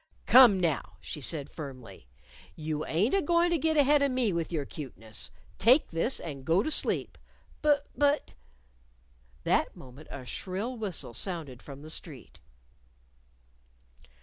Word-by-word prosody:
"Come, 245 -7 +8
now!" 165 -5 -1
she 150 - -7
said 145 0 +1
firmly. 130 - -9 0.5
"You 155 -1 -3
ain't 195 - +1
a 395 - +3
goin' 340 +3 +2
to 340 - +2
git 315 +1 +1
ahead 290 0 +5
of 280 - +3
me 250 -6 +1
with 170 0 -2
your 155 -4 -2
cuteness. 115 -8 -7 0.3
Take 250 +8 +4
this, 165 +10 0
and 140 -5 -7
go 165 +7 +2
to 310 - -2
sleep." - - +1 0.4
"Bu 300 -1 +5 0.2
but 290 +2 +1 0.5
" - - -33
That - - +1
moment 130 +4 -13
a 130 - -8
shrill 195 - -4
whistle 195 - -4
sounded 150 - -4
from 140 0 -11
the 155 - -6
street. 150 -7 -7
165 Hz, 150 wpm, -29 LUFS, -, 0.5 s, Come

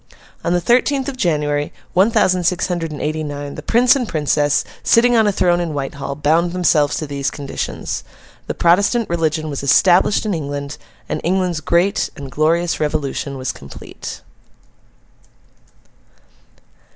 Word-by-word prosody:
On - - 0
the 175 - +2
thirteenth 255 +7 +2
of 275 - -6
January, 150 - 0 0.2
one 190 +5 +4
thousand 185 -5 +2
six 180 +1 +1
hundred 170 -3 -3
and 150 - -6
eighty 155 +1 -2
nine, 145 -1 -5
the - - -7
Prince 245 +3 +4
and 250 -4 -1
Princess, 145 -1 +1 0.2
sitting 240 +1 +4
on 220 -2 +4
a - - +3
throne 175 -2 +2
in 165 -3 -3
Whitehall, 140 0 -4
bound 165 +4 +1
themselves 155 -5 +2
to 155 - -3
these 140 -1 -2
conditions. 140 -2 -5 0.4
The - - -3
Protestant 200 +7 +3
religion 160 -2 -1
was 140 -2 -4
established 175 - +4
in 210 - 0
England, 145 -2 -5 0.3
and - - -3
England's 180 -2 0
great 175 +5 +1
and 140 -5 -8
glorious 165 +4 +1
Revolution 145 -2 -2
was 130 -1 -2
complete. 70 - -10
165 Hz, 150 wpm, -19 LUFS, 145-185 Hz, 0.4 s, one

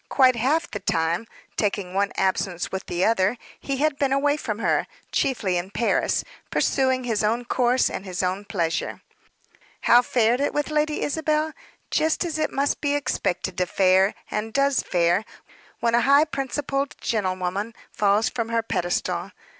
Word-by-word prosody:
Quite 260 -2 +5
half 285 +8 0
the 205 - -4
time 165 +7 0 0.3
taking 200 -3 -1
one 200 +1 +1
absence 190 -2 0
with 190 0 -5
the 175 +1 0
other 220 +1 +2 0.2
he 275 -1 -3
had 295 0 0
been 275 -2 +1
away 285 +2 +2
from 215 -8 -4
her, 230 - +1 0.2
chiefly 205 -9 0
in 175 +2 -3
Paris, 230 +4 +1 0.3
pursuing 260 -1 +1
his 225 -4 0
own 230 +3 0
course 250 +1 +2
and - - -4
his 185 -1 -3
own 185 +3 -1
pleasure. 170 -5 -2 0.8
How 240 - +6
fared 240 0 +2
it 285 - 0
with 295 +1 -1
Lady 305 0 0
Isabel? 310 +1 0 0.4
Just 315 +3 +1
as 315 -2 -3
it 310 - 0
must 280 +1 0
be 285 -1 +1
expected 190 -9 -2
to 180 - +1
fare, 190 +2 +3 0.2
and 215 +1 -2
does 275 0 +2
fare, 175 +3 +1 0.6
when 235 -1 +1
a 235 - +4
high 280 +4 +5
principled 275 -1 -2
gentlewoman 190 +1 -2 0.2
falls 210 +2 +2
from 230 -2 -3
her 230 0 0
pedestal. 175 -5 -2
230 Hz, 160 wpm, -24 LUFS, 190-275 Hz, 0.8 s, How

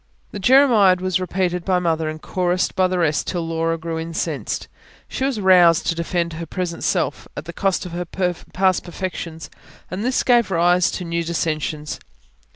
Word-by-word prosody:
This 205 - -6
jeremiad 225 -6 +5
was 185 0 0
repeated 180 -1 -1
by 185 0 +2
Mother 165 -3 0
and 155 0 -6
chorused 180 +2 -1
by 185 -1 +3
the 185 0 -2
rest 155 -4 +1
till 175 -3 -2
Laura 165 0 -1
grew 165 0 -4
incensed. 165 0 -3 0.4
She 265 - -2
was 270 -5 -1
roused 180 -4 +5
to - - +1
defend 170 0 -2
her 165 +1 -6
present 175 -2 -4
self, - - -1
at - - -5
the - - -7
cost 195 -1 0
of 180 - -7
her 175 +1 -4
past 185 +1 -1
perfections; 170 -4 -6 0.4
and 185 +3 -3
this 255 +2 +1
gave 240 -4 +3
rise 175 0 +3
to 180 - -5
new 170 0 -1
dissensions. 155 -2 -2
175 Hz, 175 wpm, -21 LUFS, 165-185 Hz, 0.4 s, jeremiad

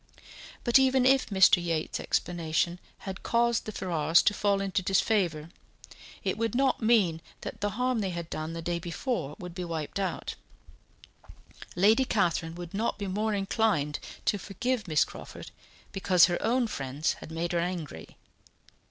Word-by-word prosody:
But 240 +1 +5
even 265 -1 +3
if 265 -1 +4
Mr. 190 -3 +5
Yates's 165 -2 -2
explanation 170 0 -1 0.3
had 190 -1 -6
caused 235 -1 +1
the 215 - -4
Ferrars 170 -5 +2
to 210 - +3
fall 200 -1 +1
into 195 -2 -1
disfavour, 185 -5 +1 0.7
it - - -1
would 230 0 -1
not 265 0 +2
mean 205 -8 +3 0.2
that - - -7
the 205 +1 -2
harm 250 -1 +1
they 195 -3 -1
had 170 -2 -5
done 155 0 -5
the 165 0 -6
day 170 0 -1
before 170 - -3
would 180 -1 -8
be 180 +1 -5
wiped 165 +1 -4
out; 190 -3 -3 1.4
Lady 215 +8 +5
Catherine 170 -8 0
would 175 -1 -8
not 220 +4 -1
be 205 - -4
more 210 +3 -1
inclined 195 -7 0 0.3
to 205 - +1
forgive 220 +4 -2
Miss 155 -4 +3
Crawford - - -10 0.4
because 185 -2 +5
her 175 -1 -1
own 245 +2 +2
friends 140 - -2
had - - -10
made 165 +1 -3
her 175 - +1
angry. 170 - -5
185 Hz, 160 wpm, -28 LUFS, 165-220 Hz, 1.4 s, But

